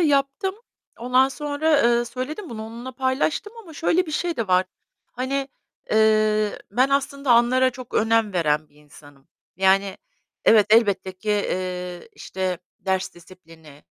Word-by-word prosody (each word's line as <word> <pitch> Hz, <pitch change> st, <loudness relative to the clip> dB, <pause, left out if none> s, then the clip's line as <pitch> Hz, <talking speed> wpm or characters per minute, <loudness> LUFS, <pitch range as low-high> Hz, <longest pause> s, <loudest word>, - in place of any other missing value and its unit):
yaptım. 290 Hz, +5 st, +1 dB, 0.4 s
Ondan 250 Hz, +2 st, +3 dB
sonra, 295 Hz, +1 st, 0 dB
eee, 235 Hz, 0 st, +3 dB
söyledim 260 Hz, -, -6 dB
bunu, 220 Hz, -2 st, -6 dB
onunla 235 Hz, +3 st, -8 dB
paylaştım 265 Hz, -, -1 dB
ama 340 Hz, -6 st, -13 dB
şöyle 335 Hz, +3 st, +1 dB
bir -, -, -6 dB
şey 340 Hz, +2 st, -2 dB
de 230 Hz, -, -2 dB
var. 185 Hz, 0 st, +4 dB, 0.5 s
Hani, 270 Hz, +2 st, -2 dB, 0.4 s
eee, 215 Hz, -1 st, +2 dB
ben 255 Hz, +6 st, +2 dB
aslında 280 Hz, 0 st, -1 dB
anlara 255 Hz, +2 st, +4 dB
çok 255 Hz, -1 st, -11 dB
önem 225 Hz, -1 st, +2 dB
veren 155 Hz, -3 st, 0 dB
bir -, -, -31 dB
insanım. 145 Hz, -2 st, -18 dB, 0.3 s
Yani 195 Hz, 0 st, +2 dB, 0.5 s
evet, 215 Hz, -2 st, +6 dB
elbette 205 Hz, -4 st, +3 dB
ki, 185 Hz, +3 st, -10 dB
eee, 180 Hz, -3 st, -3 dB
işte, 185 Hz, -2 st, -4 dB, 0.2 s
ders 190 Hz, -1 st, -2 dB
disiplini 165 Hz, -4 st, -17 dB
225 Hz, 135 wpm, -23 LUFS, 185-275 Hz, 0.5 s, evet